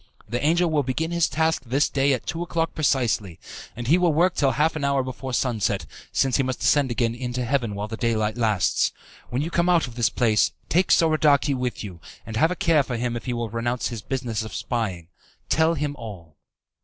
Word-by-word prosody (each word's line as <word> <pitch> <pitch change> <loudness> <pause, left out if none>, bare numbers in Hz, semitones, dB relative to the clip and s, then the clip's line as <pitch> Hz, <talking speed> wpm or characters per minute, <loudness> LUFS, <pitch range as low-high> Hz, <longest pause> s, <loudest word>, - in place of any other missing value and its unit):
The 120 +4 -3
angel 170 +4 +3
will 150 -2 +2
begin 145 +5 -2
his 170 -1 +2
task 160 +1 +1
this 135 +4 +1
day 140 0 +1
at 125 - -3
two 165 - -3
o'clock 165 -1 -1
precisely, 120 - 0 0.4
and 120 +1 -6
he 160 +9 +4
will 175 -2 +3
work 170 +4 +3
till 135 -2 +2
half 155 +3 +1
an 155 - -3
hour 140 -1 +2
before 130 +1 -6
sunset, 120 -4 0 0.3
since 135 -2 +2
he - - +3
must 130 -1 -3
ascend 145 -3 +3
again 115 -1 0
into 125 0 -3
heaven 120 -5 0
while 105 +1 -3
the 110 +1 -6
daylight 110 -2 0
lasts. 110 -6 +1 0.4
When 125 +4 -1
you 165 - -4
come 170 +1 +2
out 175 -2 +4
of 125 - -9
this 120 -1 +1
place, 110 -4 +2 0.2
take 180 +3 +2
Soradaci 155 -3 +4
with 125 -5 -3
you, 90 -5 -9 0.2
and 110 - -7
have 160 +9 +3
a 180 - -2
care 165 -4 +3
for 125 -3 -4
him 120 0 -2
if 120 - -6
he 125 - -2
will 120 -2 -3
renounce 120 +1 -1
his 115 -3 -6
business 120 -2 -3
of 110 -3 -7
spying. 95 -9 -3 0.4
Tell 160 +1 +3
him 145 -1 -2
all. 95 - -10
130 Hz, 215 wpm, -24 LUFS, 115-155 Hz, 0.4 s, he